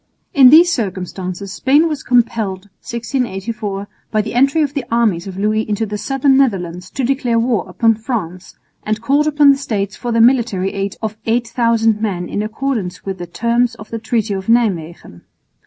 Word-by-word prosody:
In 265 -3 +8
these 335 +5 +7
circumstances 190 -2 -4
Spain 280 - +3
was 300 -4 -3
compelled 225 -6 0 0.2
(1684) 220 -4 -4 0.2
by 215 - 0
the 215 - -6
entry 275 +6 +3
of 285 -1 -2
the 280 -4 -2
armies 215 -7 +1
of 190 -1 -7
Louis 215 +2 +1
into 215 0 -2
the 210 0 -5
southern 270 +2 +2
Netherlands 180 -9 0
to 270 - -4
declare 250 -2 0
war 230 -6 0
upon 225 +5 +2
France, 210 -6 -5 0.3
and 215 0 -2
called 280 +7 +1
upon 295 -1 +5
the 275 - 0
States 200 -7 -3
for 240 - -4
their 230 - +1
military 225 -6 +2
aid 195 0 -3
of 215 0 -3
8000 230 -2 +1
men 180 -5 -2
in 205 - -3
accordance 215 -5 -3
with 190 -2 -4
the 175 - -6
terms 235 +5 0
of 215 -2 -13
the 230 - -3
treaty 220 -1 -1
of 190 -1 -5
Nijmwegen. 175 - -1
225 Hz, 175 wpm, -17 LUFS, 195-245 Hz, 0.3 s, In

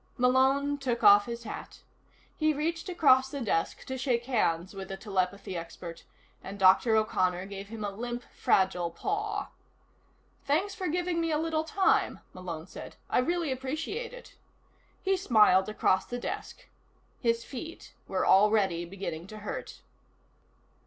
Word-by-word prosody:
Malone 265 +3 +3
took 250 -4 -2
off 205 +1 +7
his 235 0 -5
hat. 215 - -8 0.5
He 310 -1 +2
reached 330 +5 -2
across 265 -7 +4
the 280 - -5
desk 205 -9 -1
to 260 0 -5
shake 245 -3 0
hands 185 -8 0
with 195 -1 -7
the 195 - -6
telepathy 195 -2 -2
expert, 170 0 -8 0.4
and 195 +1 -7
Dr. 195 +4 +5
O'Connor 185 -4 +1
gave 200 0 -7
him 220 0 -7
a 205 - -2
limp 240 +4 -5
fragile 180 -3 +2
paw. 410 - -3 0.9
"Thanks 350 +8 +1
for 370 - -3
giving 350 +1 0
me 330 - 0
a 305 - +2
little 320 0 0
time," 380 +4 +1
Malone 170 -3 -6
said. - - -10 0.2
"I - - +4
really 335 +2 0
appreciate 310 - -3
it." - - -12 0.7
He 385 0 +2
smiled 215 - +4
across 190 -3 +1
the 245 - -4
desk. - - -6 0.5
His 230 -1 +1
feet 320 +6 -8
were - - 0
already 195 -4 +4
beginning 175 -2 -6
to 215 - -9
hurt. 210 - -6
235 Hz, 145 wpm, -29 LUFS, 195-310 Hz, 0.9 s, off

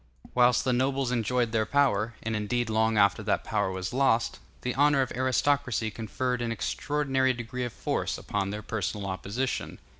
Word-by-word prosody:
Whilst 125 0 +4
the 130 - +1
nobles 130 0 +1
enjoyed 120 0 +1
their 110 -1 +1
power, 120 -6 +2
and 115 0 -2
indeed 110 +2 -1
long 110 0 +2
after 100 -1 +4
that - - 0
power - - 0
was 95 +3 -4
lost, 125 -3 +2 0.2
the 125 - -2
honor 140 +1 +4
of 130 - -6
aristocracy 130 -2 +1
conferred 125 +3 -2
an 120 -1 -1
extraordinary 135 +3 0
degree 125 +1 -4
of 120 - -4
force - - -2
upon 100 -1 -2
their 105 +1 -5
personal 105 -1 -3
opposition. 100 +7 -3
120 Hz, 170 wpm, -28 LUFS, 110-130 Hz, 0.2 s, Whilst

